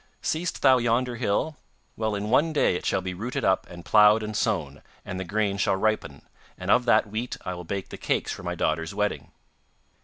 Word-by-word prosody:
'Seest 165 +3 -2
thou 130 -1 +6
yonder 120 +1 0
hill? 120 +7 -1 0.4
Well, 110 -1 -1
in 105 +2 -3
one 155 +5 +3
day 145 - +2
it - - -3
shall - - +1
be 90 -1 -3
rooted 115 +7 -3
up 95 0 +1
and 85 0 -11
ploughed 105 0 +6
and 105 0 -5
sown, 85 - -1 0.2
and 95 -1 -5
the - - -2
grain 100 +2 -1
shall 95 - +2
ripen, 110 +2 -1 0.3
and - - -2
of 125 - +4
that 120 - +4
wheat 115 +3 -3
I 90 - -2
will 90 -1 -8
bake 95 +2 -4
the - - -8
cakes - - -1
for - - -6
my - - -3
daughter's 80 +4 -1
wedding. 105 0 -2
105 Hz, 210 wpm, -26 LUFS, 95-120 Hz, 0.4 s, thou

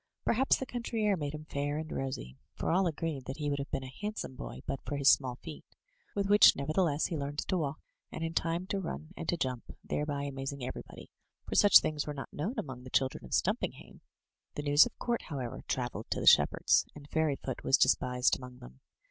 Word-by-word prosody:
Perhaps 260 +4 +3
the 265 - -4
country 235 -3 -3
air 205 -2 +3
made 150 -3 -4
him 155 0 -8
fair 145 0 -2
and 155 0 -5
rosy 130 - -4
— - - -52
for - - -1
all 185 +2 +3
agreed 160 -4 -3
that 135 - -5
he 145 -2 -1
would 140 - -1
have 140 - -4
been 135 - -2
a 130 0 -9
handsome 210 -9 -4
boy - - -8
but 135 - -3
for 145 - -3
his 140 -1 +1
small 130 -3 +1
feet, 160 -3 -8 0.5
with 200 -1 0
which 205 +1 +8
nevertheless 155 +2 +1
he 170 - -2
learned 145 -1 -4
to 185 - -1
walk, 155 -3 -2 0.3
and 160 - -5
in 165 0 -2
time 170 +2 0
to 195 +1 -2
run 165 -3 -6
and - - -5
to 175 - +1
jump, 130 -5 -2 0.2
thereby 145 -1 -2
amazing 135 -1 -4
everybody, 130 - -8 0.4
for - - -4
such 205 - +8
doings 150 -1 -2
were 150 - -4
not 135 - -7
known 190 - -3
among 130 -3 -5
the 130 - -9
children 130 - 0
of 65 - -11
Stumpinghame. - - -2 0.5
The 145 - -3
news 145 +1 +6
of - - -14
court, 240 -1 -1
however, 130 -7 -5
travelled 120 -4 -3
to - - -1
the - - -3
shepherds, - - +5
and 145 -1 -11
Fairyfoot 145 -5 -1
was 135 - +4
despised 125 -1 +3
among 125 -1 -10
them. 65 - -13
145 Hz, 220 wpm, -31 LUFS, 135-165 Hz, 0.5 s, which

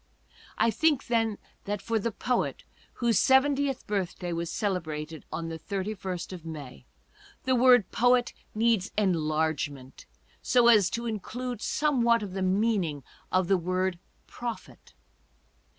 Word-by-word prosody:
I 230 - +3
think, 295 +3 +2
then, 225 -3 +1 0.3
that 205 0 -2
for 225 +2 -1
the 230 +3 -2
poet 250 +4 -1 0.3
whose 235 -2 +2
seventieth 270 0 +3
birthday 185 -3 -2
was 170 0 -3
celebrated 160 -6 -3
on 165 0 -4
the 165 0 -6
31st 190 -2 -4
of 175 -3 -8
May, 145 - -9 0.6
the 260 - +1
word 245 -5 +5
poet 245 +1 +3 0.2
needs 225 -3 +2
enlargement 155 -7 -1 0.3
so 240 -1 +4
as 210 -6 +6
to 235 +1 -3
include 235 +2 -4
somewhat 235 -7 +2
of 195 -3 -6
the 190 - -3
meaning 185 - +1 0.3
of 185 -1 +2
the 195 0 +4
word 185 +1 -1 0.3
prophet. 240 -2 -8
200 Hz, 130 wpm, -28 LUFS, 175-235 Hz, 0.6 s, as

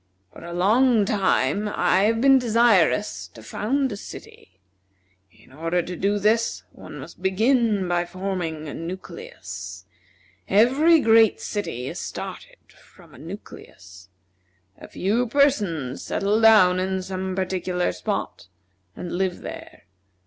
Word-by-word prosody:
"For - - -12
a 170 - -8
long 215 +5 +3
time 200 -2 +1
I 190 -1 +2
have 225 +1 +1
been 270 0 +6
desirous 215 - +2
to 110 - -12
found 260 - -1
a - - -4
city. 95 - -12 0.7
In 110 +5 -22
order 165 +4 -1
to 180 - -6
do 200 +4 0
this 220 +3 +1
one - - -11
must - - -11
begin 210 +1 +2
by 175 0 0
forming 175 -4 -4
a - - -6
nucleus. 190 - -8 0.6
Every 270 - +4
great 225 -2 +4
city 165 - -4
is - - -6
started - - -8
from - - -20
a - - -14
nucleus. 95 -2 -12 0.7
A - - -13
few 225 +6 -1
persons 205 - +1
settle 205 +3 0
down 200 -5 +6
in 190 0 -2
some 185 0 -4
particular 185 -1 -1
spot, 90 0 -4 0.5
and 175 - -7
live 185 0 -2
there. - - -9
190 Hz, 130 wpm, -23 LUFS, 175-225 Hz, 0.7 s, been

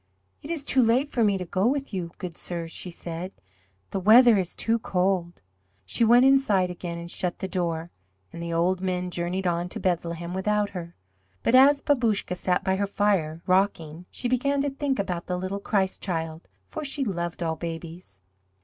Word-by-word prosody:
"It 290 - -10
is 330 -4 -2
too 265 -2 +3
late 245 +5 +3
for 235 - +1
me 200 -2 +3
to 180 - -5
go 190 +4 +1
with 275 -1 -1
you, 180 -3 -3
good 180 -4 -6
sirs," 170 -1 -4
she 180 - -4
said, 170 +2 -6 0.6
"the 195 - -1
weather 225 +3 +7
is 180 -2 -2
too 230 0 +1
cold." 180 - -1 0.4
She 95 - +1
went 240 +3 +6
inside 215 -10 +3
again 175 -1 -6
and 170 0 -7
shut 180 -2 -2
the 190 - -4
door, 170 -3 -2 0.4
and 170 - -7
the 170 0 -4
old 180 +2 +1
men 180 -1 -2
journeyed 175 +2 -2
on 175 0 0
to - - -6
Bethlehem 170 -1 -2
without 205 +2 0
her. 170 -2 -7 0.5
But - - +1
as 280 +2 +6
Babouscka 230 -9 +1
sat 180 0 0
by 190 0 +1
her 200 0 0
fire, 190 -6 0
rocking, 180 -3 0
she 245 - -2
began 280 +3 +1
to 285 0 -1
think 275 -1 -1
about 180 -4 -3
the 180 - -1
Little 185 +2 -3
Christ 195 -2 0
Child, 165 -3 -4 0.2
for 310 - -6
she 280 0 -1
loved 175 -4 -3
all 160 -1 -1
babies. 165 - -8
185 Hz, 190 wpm, -26 LUFS, 170-225 Hz, 0.6 s, weather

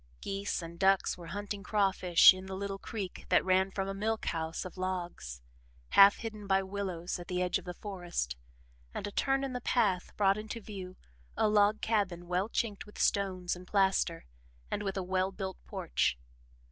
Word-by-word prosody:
Geese 195 -2 -3
and 170 +1 -9
ducks 195 0 +3
were 175 -2 -10
hunting 205 +2 -5
crawfish 195 -4 +5
in 185 0 -8
the 190 - -5
little 195 0 -4
creek 200 -5 -6
that - - +4
ran 190 +1 +3
from 195 0 -3
a 195 - -3
milk 220 +3 -2
house 165 0 -2
of 185 - -8
logs, 175 - -4 0.5
half 200 +1 +8
hidden 215 -3 -7
by 195 0 +3
willows 190 -3 -4
at 175 - -9
the 180 -1 -2
edge 180 0 +1
of - - -15
the 180 -1 -6
forest, 175 - -4 0.6
and - - -3
a 205 - -4
turn 270 +5 +1
in 270 -2 -3
the 250 - -3
path 205 -8 +1
brought 200 0 +3
into 220 +2 -6
view 190 -4 -8 0.4
a 220 - +3
log 210 0 +3
cabin 195 -6 0
well 180 +4 0
chinked 210 -3 -2
with 210 - -14
stones 185 -3 +1
and 180 +1 -12
plaster, 190 -4 +1 0.5
and 205 - -1
with 195 -1 -3
a 190 - -1
well 185 +1 0
built 190 -1 -6
porch. - - 0
195 Hz, 185 wpm, -31 LUFS, 180-205 Hz, 0.6 s, half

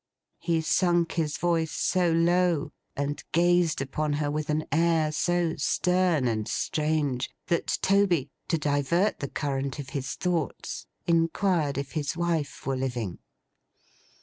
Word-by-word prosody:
He 170 -1 0
sunk 175 0 +2
his 155 -3 -1
voice 165 -2 +1
so 180 +1 +1
low, 170 -2 +2 0.2
and 145 +1 -3
gazed 175 -2 +3
upon 150 +2 -2
her 145 0 -1
with 155 0 -3
an 155 +1 0
air 165 -1 +2
so 170 +2 +1
stern 180 -6 +2
and 110 -2 -1
strange, 150 -4 0 0.2
that 170 - +1
Toby, 185 -8 +3 0.2
to 165 - +1
divert 150 +6 +1
the 140 - -4
current 140 -1 -2
of 140 -3 -6
his 135 -2 -4
thoughts, 175 -6 -2 0.2
inquired 165 -2 +1
if 140 -1 -3
his 155 +1 -2
wife 160 -8 -1
were 135 0 0
living. 120 -8 -3
155 Hz, 135 wpm, -27 LUFS, 145-170 Hz, 0.2 s, gazed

